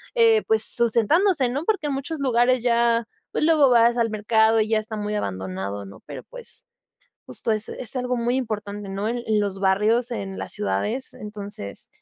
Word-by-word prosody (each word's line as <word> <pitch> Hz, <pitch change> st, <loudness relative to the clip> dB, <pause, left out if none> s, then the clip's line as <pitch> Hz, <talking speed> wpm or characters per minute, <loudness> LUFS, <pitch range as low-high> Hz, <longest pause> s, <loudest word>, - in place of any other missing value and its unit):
eh, 455 Hz, -2 st, +5 dB
pues, 220 Hz, 0 st, +2 dB
sustentándose, 255 Hz, -, +2 dB
¿no? 280 Hz, +6 st, -3 dB
Porque 400 Hz, -8 st, 0 dB
en 285 Hz, -, -1 dB
muchos 290 Hz, +4 st, -4 dB
lugares 250 Hz, -2 st, +2 dB
ya, 235 Hz, -1 st, +3 dB, 0.3 s
pues, -, -, 0 dB
luego 305 Hz, -3 st, +5 dB
vas 235 Hz, 0 st, +4 dB
al 230 Hz, -1 st, +2 dB
mercado 220 Hz, +1 st, +3 dB
y 215 Hz, -, -1 dB
ya 220 Hz, -1 st, +3 dB
está 215 Hz, +1 st, -6 dB
muy 210 Hz, 0 st, -3 dB
abandonado, 95 Hz, -, -4 dB
¿no? 100 Hz, -, -12 dB
Pero, -, -, -8 dB
pues, -, -, -10 dB, 0.6 s
justo -, -, -4 dB
es 215 Hz, 0 st, -1 dB
es 250 Hz, +1 st, -3 dB
algo 250 Hz, 0 st, -1 dB
muy 240 Hz, +2 st, 0 dB
importante, 210 Hz, -5 st, -4 dB
¿no?, 200 Hz, +2 st, -2 dB
en 240 Hz, +1 st, -2 dB
en 215 Hz, -1 st, +2 dB
los 200 Hz, -2 st, -2 dB
barrios, 210 Hz, +5 st, +2 dB
en 200 Hz, -5 st, -5 dB
las -, -, -4 dB
ciudades. 105 Hz, -, -2 dB
Entonces, 205 Hz, -, -8 dB
225 Hz, 185 wpm, -23 LUFS, 205-255 Hz, 0.6 s, eh